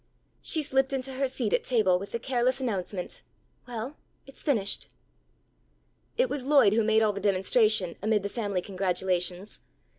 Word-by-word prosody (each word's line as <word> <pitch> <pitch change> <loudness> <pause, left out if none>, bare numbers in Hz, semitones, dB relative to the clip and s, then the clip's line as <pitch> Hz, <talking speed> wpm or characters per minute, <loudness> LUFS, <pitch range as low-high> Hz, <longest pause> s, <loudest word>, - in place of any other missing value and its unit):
She 315 - 0
slipped 270 0 +1
into 265 0 -2
her 270 +1 0
seat 250 -5 -2
at - - +2
table 205 -7 +3
with 200 +1 -8
the - - -1
careless 255 +1 0
announcement 195 -6 -3 0.5
"Well, 245 +4 -5 0.3
it's 275 - -10
finished." 220 -9 -1 1.3
It - - +3
was 290 - -3
Lloyd 275 -7 +5
who 225 +1 +3
made 220 +1 +3
all 210 -1 +2
the 200 - -5
demonstration 200 -1 +2
amid 210 -1 +1
the - - -1
family 200 -4 -2
congratulations. 185 0 -2
220 Hz, 155 wpm, -28 LUFS, 195-260 Hz, 1.3 s, Lloyd